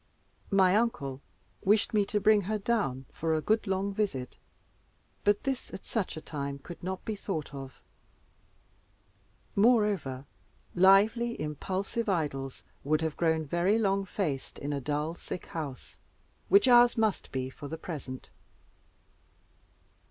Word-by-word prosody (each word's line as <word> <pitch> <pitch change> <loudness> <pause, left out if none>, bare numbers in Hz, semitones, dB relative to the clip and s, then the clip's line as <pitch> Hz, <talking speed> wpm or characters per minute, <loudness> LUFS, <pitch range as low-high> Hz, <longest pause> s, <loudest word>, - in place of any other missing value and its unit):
My 190 -2 +4
uncle 140 - 0 0.4
wished 210 +3 +3
me 210 -2 +3
to 210 - 0
bring 210 0 +5
her 215 - +1
down 200 - -1
for 160 0 0
a - - +1
good 220 +5 +1
long 195 +1 0
visit, 190 -12 -2 0.9
but 205 0 +2
this 270 -2 -3
at - - -10
such 200 -7 -2
a - - -6
time 140 -3 -4
could 170 +5 -10
not 185 +1 -4
be 220 - -2
thought 160 -7 -4
of. 135 -1 -9 1.7
Moreover, 200 - +2 0.5
lively, 210 +6 +4
impulsive 190 +9 -2
Idols 140 -7 -2 0.2
would 155 +3 +1
have 160 -2 -1
grown 160 -2 +1
very 175 +8 +2
long 195 -3 +1
faced 170 -8 -3
in 145 +1 -3
a 140 - -2
dull 150 +4 -1
sick 175 - -7
house, 145 -6 -6 0.5
which 400 -7 +6
ours 240 -1 +7
must 220 -3 0
be 130 0 -3
for 145 - -9
the 160 - -5
present. 145 -6 -7
185 Hz, 135 wpm, -30 LUFS, 145-210 Hz, 1.7 s, ours